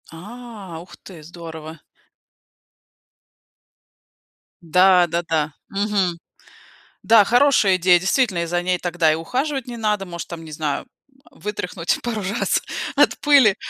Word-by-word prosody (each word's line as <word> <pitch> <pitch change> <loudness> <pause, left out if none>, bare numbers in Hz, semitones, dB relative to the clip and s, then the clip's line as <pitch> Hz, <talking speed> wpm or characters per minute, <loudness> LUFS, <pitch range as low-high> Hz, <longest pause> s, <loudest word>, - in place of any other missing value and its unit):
А, 205 -1 -10
ух 180 - -14
ты, 175 -5 -13
здорово! 160 -1 -10 2.8
Да, 180 +1 +4
да-да. 160 -3 -1 0.2
Мгм, 195 -3 -1 0.9
да, 225 -2 +6
хорошая 240 -5 +4
идея. 180 0 +5
Действительно, 190 +1 +1
и - - -3
за 175 +1 -1
ней 180 0 0
тогда 175 -2 +1
и - - +1
ухаживать 260 - -2
не 240 - -6
надо, 210 -3 -1
может 170 -2 -7
там, 170 -1 -8
не 155 - -10
знаю, 150 -1 -3 0.5
вытряхнуть 180 -4 -3
пару 230 -3 -3
раз 200 +5 0 0.3
от - - +3
пыли 275 -9 +5
185 Hz, 125 wpm, -21 LUFS, 170-215 Hz, 2.8 s, да